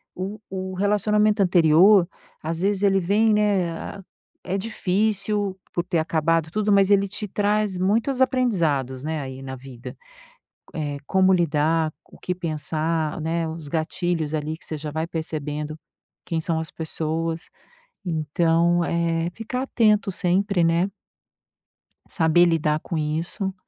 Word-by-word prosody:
o 195 +4 -5
o 190 0 -4
relacionamento 210 +2 +2
anterior 175 +1 +5 0.4
às 165 +1 -3
vezes 200 0 +1
ele 195 -1 +4
vem, 210 +5 +3
né, 195 -3 0 0.4
é 190 +2 -2
difícil 205 -1 0
por 175 - 0
ter 175 -1 -1
acabado 160 0 +1
tudo, 210 +2 0
mas 195 -1 +5
ele 200 0 +4
te 210 +1 -5
traz 205 -1 0
muitos 225 +8 +1
aprendizados, 165 - +1
né, 155 0 -2
aí 130 0 -7
na 130 0 -6
vida, 125 -2 -10 0.8
eh, 145 -3 -3
como 190 0 +4
lidar, 160 -1 +1 0.2
o - - -16
que 180 - -3
pensar, 160 -1 -2
né, 165 +1 -1
os 160 -2 -7
gatilhos 165 0 -1
ali 155 +1 -2
que - - -18
você 155 - -5
já 150 0 -5
vai 160 +2 -2
percebendo 155 -2 -4 0.5
quem 165 -1 -2
são 160 0 -1
as 160 - -6
pessoas, 160 +1 -3 0.6
então, 165 +1 +1
eh, 170 0 0
ficar 250 +3 -4
atento 215 -6 +2
sempre, 185 +1 +1
né? 170 +4 +2 1.2
Saber 170 +1 +4
lidar 155 -2 +1
com 165 - -4
isso 165 +6 -2
170 Hz, 135 wpm, -23 LUFS, 160-200 Hz, 1.2 s, anterior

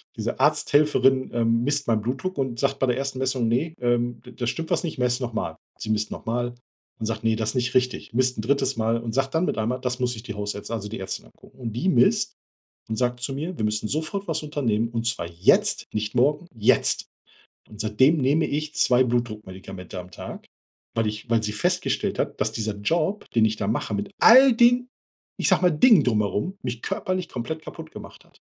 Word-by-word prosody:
diese - - -3
Arzthelferin, 135 -3 +3
ähm, 115 0 +2
misst 145 +2 0
mein 110 -2 +2
Blutdruck 135 - -3
und 130 -4 -2
sagt 140 0 +1
bei - - +3
der 125 0 +1
ersten 135 -1 -3
Messung: 130 -2 0
„Ne, 150 +8 0
ähm, 120 0 0
d 125 - -11
da 120 +1 -3
stimmt 165 +6 -3
was - - +1
nicht, 160 - -5
messt 125 0 +1
noch 120 -2 -3
mal.“ - - -3 0.2
Sie - - -6
misst 105 0 0
noch - - -7
mal 120 +1 -1 0.5
und 110 - -3
sagt: 110 0 -3
„Ne, 110 0 +3
das 110 0 -1
ist - - -4
nicht 125 0 0
richtig.“ 125 -2 0
Misst 125 +1 +1
'n - - -1
3. 135 +2 0
Mal 115 +1 +1
und 115 -1 -5
sagt 135 +1 0
dann 160 - +2
mit - - -2
einmal: 120 +4 -1
„Das 125 0 -2
muss 125 -1 0
sich 110 -1 -9
die 105 -4 -6
Hausärzti 105 +1 -5
also, 105 -3 -3
die 110 - -6
Ärztin 95 -8 -5
angucken.“ - - -20
Und 115 -4 -5
die 125 - 0
misst 125 -8 +3 0.6
und 110 - -2
sagt 125 0 0
zu 135 +2 -2
mir: 160 +6 -4
„Wir 110 - 0
müssen 105 0 -1
sofort 160 - -3
was 160 -2 -2
unternehmen, 115 -7 0
und 115 0 -2
zwar 115 -7 -2
jetzt, 85 +2 +3
nicht 105 0 -2
morgen, 145 +7 +2
jetzt.“ 110 -2 +2 0.6
Und 105 - -13
seitdem 130 +9 +3
nehme 145 +3 +2
ich 150 +1 -3
2 125 +1 +4
Blutdruckmedikamente 100 -6 -4
am 90 0 -9
Tag, - - -8 0.5
weil 115 - +1
ich 105 +2 -5
weil 115 -1 +2
sie 105 - -1
festgestellt 105 - 0
hat, - - -2
dass - - +1
dieser 110 -1 -3
Job, 165 - 0
den 115 -1 +5
ich 110 0 0
da 100 - -2
mache, 110 0 -1
mit 100 0 -3
all 260 +3 +8
den, 245 +2 +4 0.5
ich - - +1
sage - - +4
mal, 180 - +5
Dingen 185 - +6
drumherum, 110 - 0
mich 120 -2 -4
körperlich 185 -3 -2
komplett 140 +7 -4
kaputt - - -9
gemacht - - -11
hat. - - -26
120 Hz, 220 wpm, -24 LUFS, 110-140 Hz, 0.6 s, all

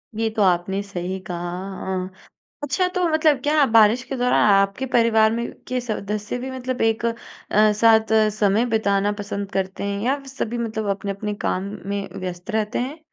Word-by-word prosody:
ये 225 +1 0
तो 215 - +1
आपने 185 +1 +1
सही 190 -1 -4
कहा, 175 - -4 0.4
हाँ। 185 0 -4 0.5
अच्छा, 290 +6 +1
तो 360 -1 0
मतलब 315 -3 +3
क्या 295 0 +4
बारिश 225 0 +5
के 270 +1 -5
दौरान 250 0 +2
आपके 195 +6 +2
परिवार 225 -2 +4
में 235 +1 -3 0.2
के 255 0 -1
सदस्य 210 -1 -3
भी 260 +1 -5
मतलब 255 -1 -4
एक 225 +1 +1
अ, 230 - +1 0.7
साथ 220 -1 +5 0.3
समय 205 +3 +3
बिताना 205 -3 +1
पसंद 200 -1 -4
करते 190 0 -3
हैं 200 0 -2
या 275 +3 +1
सभी 240 -3 -4
मतलब 220 -2 -3
अपने-अपने 200 +1 -4
काम 185 - 0 0.3
में 200 0 -2
व्यस्त 180 +3 -6
रहते 215 -1 -1
हैं? 270 +6 -4
220 Hz, 170 wpm, -22 LUFS, 200-245 Hz, 0.7 s, बारिश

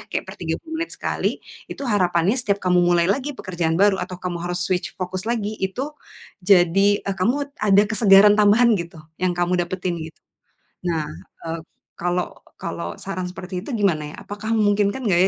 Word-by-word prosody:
Kayak - - -2
per - - -7
30 320 -1 -4
menit 335 - -3
sekali, - - -1 0.3
itu - - -7
harapannya 185 -4 +2
setiap 205 -5 0
kamu 180 -1 +4
mulai 175 -1 +4
lagi 260 +10 0
pekerjaan 170 -3 -1
baru 195 0 +4
atau 180 0 -5
kamu 180 -1 -4
harus 175 0 -2
switch 185 +1 -2
fokus 185 +1 -4
lagi, 220 -3 -1
itu 190 +8 -2 0.6
jadi, 195 +2 +4
eee, 195 - -1
kamu 280 +9 0
ada 205 -1 +5
kesegaran 205 -2 +7
tambahan 220 +3 +5
gitu, 170 -1 -6 0.2
yang 185 -1 +2
kamu 175 0 +1
dapetin, 180 -2 -3
gitu. 160 0 -8 0.7
Nah, 160 -3 -1 0.4
eee, 165 0 -3 0.4
kalau 175 +1 -1 0.2
kalau 85 +1 -5
saran 185 -2 -4
seperti 180 0 -6
itu - - -9
gimana, 155 -7 +1
ya? - - -8
Apakah 210 +2 -5
memungkinkan 205 +1 +2
nggak, 175 -3 +3
185 Hz, 170 wpm, -22 LUFS, 175-205 Hz, 0.7 s, kesegaran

